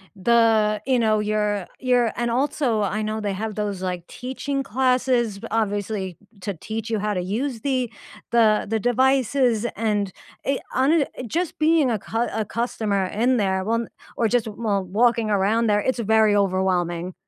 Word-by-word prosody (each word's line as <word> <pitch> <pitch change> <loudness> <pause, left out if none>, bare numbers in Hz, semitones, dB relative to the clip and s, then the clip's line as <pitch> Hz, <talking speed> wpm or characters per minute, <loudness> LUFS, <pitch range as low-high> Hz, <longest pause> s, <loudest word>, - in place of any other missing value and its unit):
the 215 0 +3
you 260 -2 +2
know, 215 -2 +2
you're 210 -2 -1
you're 245 -3 +2
and, 240 0 -1
also, 245 -2 0
I 205 +2 -1
know 215 +1 -2
they 205 -2 -2
have 215 +2 -4
those, 205 -3 -3
like, 180 -2 -3
teaching 270 +2 -4
classes 250 -3 +1
b - - -7
obviously 205 -4 -2 0.2
to 200 +2 -3
teach 220 +6 -6
you 220 -2 0
how 210 0 -1
to 180 - -1
use 225 +6 -3
the 255 -3 -1 0.4
the 220 -3 +4
the 225 - 0
devices 250 -1 +2
and, 205 -2 0 0.3
eh 275 0 +1
hone 280 +4 +3 0.2
just 340 +7 -2
being 310 -3 +4
a 225 -3 0
cu 230 +4 -2
a 220 +1 0
customer 215 -3 -1
in 235 +7 +1
there 190 -3 0
won 230 +3 -1 0.3
or 230 - +2
just 235 0 +1
lol 210 -2 -1
walking 225 +4 +2
around 210 +3 +2
there, 210 -1 +3
it's 255 +3 -1
very 220 -1 +3
overwhelming. 185 -3 0
220 Hz, 165 wpm, -23 LUFS, 205-245 Hz, 0.4 s, the